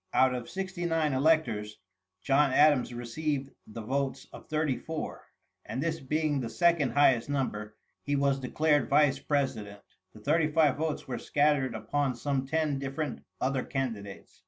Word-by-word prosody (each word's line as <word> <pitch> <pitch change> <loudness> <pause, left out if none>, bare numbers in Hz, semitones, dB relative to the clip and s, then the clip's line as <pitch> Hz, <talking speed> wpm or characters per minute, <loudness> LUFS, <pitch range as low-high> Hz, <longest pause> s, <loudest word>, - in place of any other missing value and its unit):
Out 130 -1 +4
of 125 -2 -5
sixty 190 -1 -3
nine 160 -3 +1
electors, 130 -8 +1 0.5
John 140 0 +3
Adams 145 -2 +4
received 135 +3 -3 0.2
the 110 +1 -8
votes 135 +3 -2
of - - -12
thirty 155 -3 0
four; 160 +3 -6 0.4
and - - -5
this 160 +2 -1
being 150 +1 0
the 120 -3 -3
second 170 -1 +2
highest 135 -4 +4
number, 105 -7 -2 0.3
he 145 - -1
was 140 -1 +2
declared 145 +2 +1
vice 145 -1 +4
president. 120 -8 -2 0.3
The 110 - -13
thirty 155 +7 +2
five 150 -3 +4
votes 155 0 -3
were 125 -3 -4
scattered 145 -4 +1
upon 135 +3 -1
some 135 +2 -2
ten 155 -2 0
different 140 0 -4 0.2
other 130 0 0
candidates. 115 -8 -5
140 Hz, 155 wpm, -29 LUFS, 125-155 Hz, 0.5 s, Out